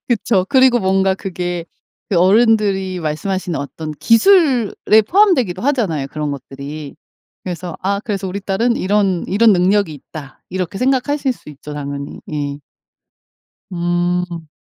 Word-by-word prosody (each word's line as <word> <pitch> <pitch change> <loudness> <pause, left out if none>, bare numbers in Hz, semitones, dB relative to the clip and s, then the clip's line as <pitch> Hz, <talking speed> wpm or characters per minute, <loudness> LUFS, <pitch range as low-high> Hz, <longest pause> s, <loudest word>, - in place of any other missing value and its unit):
그쵸. 225 -5 +1
그리고 260 -3 +5
뭔가 190 0 +2
그게 180 -2 -4 0.4
그 195 - 0
어른들이 195 -2 +3
말씀하시는 170 +3 -2
어떤 155 +2 -6
기술에 235 - +4
포함되기도 325 - +3
하잖아요 205 - 0
그런 150 0 -3
것들이. 140 +2 -8 0.5
그래서 180 -2 -5
아 200 +1 0
그래서 200 -3 -3
'우리 190 +2 -4
딸은 215 +5 0
이런 195 -2 +1
이런 220 +3 +4
능력이 190 -1 +2
있다.' 145 -1 -11
이렇게 185 0 -3
생각하실 265 +2 +1
수 245 - -16
있죠 150 +1 -10
당연히. 140 0 -6
예. 145 -1 -3 1.1
음. 175 -1 -1
190 Hz, 300 characters per minute, -18 LUFS, 160-220 Hz, 1.1 s, 그리고